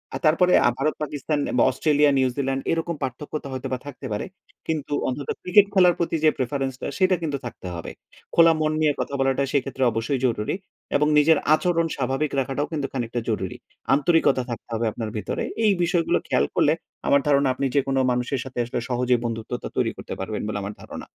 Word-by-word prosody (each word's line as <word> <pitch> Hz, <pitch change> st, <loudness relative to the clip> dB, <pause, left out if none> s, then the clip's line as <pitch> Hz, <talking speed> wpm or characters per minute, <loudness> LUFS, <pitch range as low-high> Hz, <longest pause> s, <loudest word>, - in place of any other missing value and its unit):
আর -, -, -3 dB
তারপরে 180 Hz, +4 st, +4 dB
আ -, -, +5 dB
ভারত-পাকিস্তান 150 Hz, 0 st, -2 dB, 0.2 s
বা -, -, +5 dB
অস্ট্রেলিয়া-নিউজিল্যান্ড 135 Hz, -3 st, +2 dB
এরকম 165 Hz, 0 st, -1 dB
পার্থক্যতা 140 Hz, +3 st, -5 dB
হয়তোবা 130 Hz, 0 st, -3 dB
থাকতে 140 Hz, -1 st, -9 dB
পারে। 105 Hz, -, -2 dB, 0.4 s
কিন্তু 150 Hz, -2 st, -2 dB, 0.2 s
অন্তত 135 Hz, +2 st, -5 dB
ক্রিকেট 195 Hz, +2 st, +5 dB
খেলার 180 Hz, -2 st, +6 dB
প্রতি 170 Hz, -1 st, 0 dB
যে, 155 Hz, -, +7 dB
প্রেফারেন্স 135 Hz, +1 st, -1 dB
টা -, -, -3 dB
সেটা 185 Hz, -1 st, +4 dB
কিন্তু 145 Hz, -4 st, -2 dB
থাকতে 105 Hz, -5 st, -7 dB
হবে। 85 Hz, -, -6 dB, 0.4 s
খোলা 165 Hz, -1 st, +7 dB
মন 155 Hz, 0 st, +2 dB
নিয়ে 150 Hz, -2 st, +3 dB
কথা -, -, -3 dB
বলাটা 135 Hz, +1 st, +2 dB
সেক্ষেত্রে 135 Hz, -2 st, -1 dB
অবশ্যই 120 Hz, +4 st, -1 dB
জরুরি 115 Hz, +4 st, 0 dB, 0.4 s
এবং 150 Hz, +1 st, +3 dB
নিজের 150 Hz, +1 st, +5 dB, 0.2 s
আচরণ 170 Hz, 0 st, +2 dB
স্বাভাবিক 135 Hz, +3 st, -1 dB
রাখাটাও 135 Hz, +3 st, -1 dB
কিন্তু 145 Hz, -3 st, -2 dB
খানিকটা 120 Hz, -2 st, -2 dB
জরুরি। 95 Hz, -4 st, -2 dB, 0.4 s
আন্তরিকতা 145 Hz, -3 st, +3 dB
থাকতে 120 Hz, 0 st, -6 dB
হবে 115 Hz, +1 st, 0 dB
আপনার 110 Hz, -1 st, -5 dB
ভিতরে। -, -, -3 dB, 0.2 s
এই 210 Hz, -, +5 dB
বিষয়গুলো 170 Hz, -1 st, +2 dB
খেয়াল -, -, +2 dB
করলে -, -, +4 dB, 0.3 s
আমার 140 Hz, 0 st, +5 dB
ধারণা 140 Hz, -1 st, +4 dB
আপনি 140 Hz, -, -2 dB
যেকোনো 135 Hz, -1 st, +2 dB
মানুষের 125 Hz, +2 st, -1 dB
সাথে 130 Hz, -2 st, -11 dB
আসলে 120 Hz, -, -3 dB
সহজেই 125 Hz, 0 st, +2 dB
বন্ধুত্বা 115 Hz, -1 st, -4 dB
তৈরি -, -, +2 dB
করতে -, -, -7 dB
পারবেন 105 Hz, +3 st, -3 dB
বলে 105 Hz, -1 st, -2 dB
আমার 100 Hz, +1 st, -5 dB
ধারণা। -, -, -9 dB
140 Hz, 180 wpm, -24 LUFS, 125-155 Hz, 0.4 s, যে